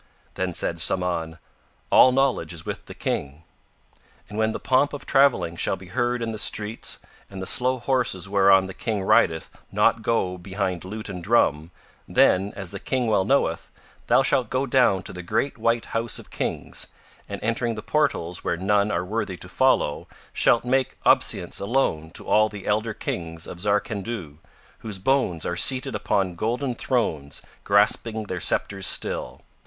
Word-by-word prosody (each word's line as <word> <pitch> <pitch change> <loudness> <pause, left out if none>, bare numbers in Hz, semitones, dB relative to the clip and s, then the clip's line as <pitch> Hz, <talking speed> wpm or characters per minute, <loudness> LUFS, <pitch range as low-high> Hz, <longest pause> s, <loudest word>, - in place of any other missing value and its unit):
Then 90 -2 -2
said 85 - +1
Samahn: 85 -2 -1 0.5
"All 130 - +7
knowledge 130 -11 +1
is 80 -1 -10
with - - -5
the - - -9
King," 70 +3 -3 0.8
and 105 - -10
when 110 0 +1
the - - -5
pomp 135 +3 +2
of 140 -2 -7
travelling 135 -11 +3
shall 85 - -1
be 95 -1 -13
heard 120 +4 -1
in 115 - -2
the 110 - -4
streets 105 +2 0 0.3
and 95 - -8
the 95 - -4
slow 130 +6 +3
horses 120 -8 -1
whereon 95 -1 +5
the 95 - -7
King 105 -2 -3
rideth 80 -3 +2 0.2
not 115 - +2
go 100 -5 0
behind 95 -1 -3
lute 105 +3 -6
and 90 -3 -7
drum, 80 -8 +2 0.4
then, 95 +2 +3
as 95 -3 -5
the - - -6
King 130 -2 -1
well 105 -4 +2
knoweth, 105 -9 +1 0.4
thou 135 - +4
shalt 130 -4 +1
go 130 +2 0
down 120 -8 +3
to - - -6
the 90 - -6
great 130 +9 -2
white 115 +1 +1
house 115 0 0
of - - -12
Kings - - -3 0.4
and, - - -5
entering 115 +1 -1
the 110 - -7
portals 115 - -1
where 85 - -1
none 100 +3 +2
are 85 -2 -1
worthy 100 -2 -3
to - - -10
follow, - - +1 0.3
shalt 120 - +3
make 130 +1 0
obeisance - - +3
alone 100 -8 0
to - - -5
all 110 0 +3
the 100 -2 -9
elder 110 +1 0
Kings 85 -1 -4
of 85 - -9
Zarkandhu, 100 -4 -2 0.4
whose 105 -3 -5
bones 95 - 0
are 85 - -2
seated 130 +8 +1
upon 95 -2 0
golden 120 +8 -2
thrones 80 - -2 0.2
grasping 110 +2 +2
their 95 -3 -5
sceptres 95 +1 -1
still. - - +1
105 Hz, 170 wpm, -24 LUFS, 90-120 Hz, 0.8 s, All